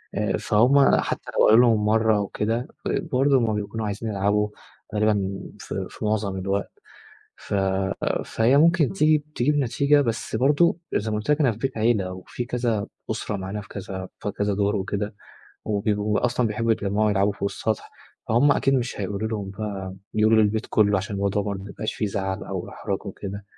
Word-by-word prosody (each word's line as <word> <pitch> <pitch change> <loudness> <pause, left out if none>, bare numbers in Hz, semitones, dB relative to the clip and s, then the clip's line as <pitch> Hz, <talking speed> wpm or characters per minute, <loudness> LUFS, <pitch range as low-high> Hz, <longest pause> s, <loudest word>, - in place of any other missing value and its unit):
آآ، - - 0
فهُم 130 +6 +4
حتى - - -3
لو - - +6
قالوا 110 +3 +7
لهم 110 -3 +3
مرة 110 0 +3
أو 100 -1 -1
كده، 115 +6 -2 0.2
ب 180 - -1
برضه 135 0 +3
هُم 115 -3 +1
بيكونوا 105 +1 -3
عايزين 105 +2 -3
يلعبوا 105 +1 +1 0.5
غالبًا 100 -2 +1 0.2
في - - -5
في - - -7
معظم 105 -2 0
الوقت، 100 +1 -2 0.7
ف - - -8 0.7
فهي 120 +5 +3
ممكن 165 0 +4
تيجي 155 -5 +3
تجيب 145 +5 +2
نتيجة 140 +2 +3
بس 115 -3 -2
برضه 145 +8 +3 0.2
زى 110 +1 0
ما 105 - 0
قُلت 105 +8 -1
لك 150 - +3
أنا 130 -5 +4
فى 105 - -8
بيت 135 +1 -3
عيلة، 110 -5 +1
وفي 95 +6 -6
كذا 120 -4 -1 0.2
أسرة 105 - -3
معانا، 95 +2 -5
في 100 - -14
كذا 95 -2 -6
في 105 - -3
كذا 105 0 -1
دور 100 +1 +1
وكده. 100 +2 -3 0.5
وبيبقو 105 0 0
أصلًا 125 0 +1
بيحبُّوا 115 +1 +1
يتجمعوا 105 0 +1
يلعبوا 100 0 +2
فوق 100 0 -2
السطح، 110 -2 -3 0.4
فهم 130 +6 +5
أكيد 135 -1 +2
مش 120 -4 -1
هيقولو 100 +2 -2
لهم 105 -3 -4
بقى 95 -2 -5 0.2
يقولوا 110 +1 +4
للبيت 105 +1 0
كله، 105 -2 +4
عشان 100 +2 -5
الموضوع 100 +1 0
برضه 100 -1 -4
ما 100 - -9
يبقاش 110 - -4
في 110 - -1
زعل 95 -1 -3
أو - - -5
احراج - - -4
وكده، 100 0 -6
105 Hz, 185 wpm, -24 LUFS, 100-120 Hz, 0.7 s, قالوا